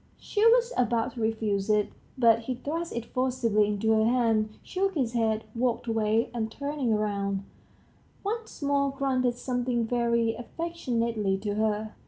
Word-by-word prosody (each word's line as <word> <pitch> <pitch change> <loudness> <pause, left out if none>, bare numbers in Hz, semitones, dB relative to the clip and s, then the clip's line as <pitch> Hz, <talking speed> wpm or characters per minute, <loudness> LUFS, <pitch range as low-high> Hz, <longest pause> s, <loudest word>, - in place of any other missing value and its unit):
She 420 - -1
was 480 +1 +4
about 240 0 +1
to 230 - -6
refuse 220 -2 0
it, 210 -1 +3 0.3
but 230 -3 +5
he 250 +2 -4
thrust 325 +7 -4
it 235 -1 -3
forcibly 245 -5 +1
into 210 +1 0
her 220 0 +4
hand, 225 -2 +2
shook 385 0 -1
his 250 -6 0
head, 220 -2 +1
walked 240 0 0
away, 225 0 +1
and 225 -2 -2
turning 280 -4 -1
round, 200 -2 -1 0.8
once 440 -5 -4
more 280 0 +2
grunted 260 -3 0
something 245 -2 -1
very 235 -1 +1
affectionately 235 - -2
to 205 -1 -2
her. 215 0 -1
235 Hz, 150 wpm, -28 LUFS, 220-260 Hz, 0.8 s, but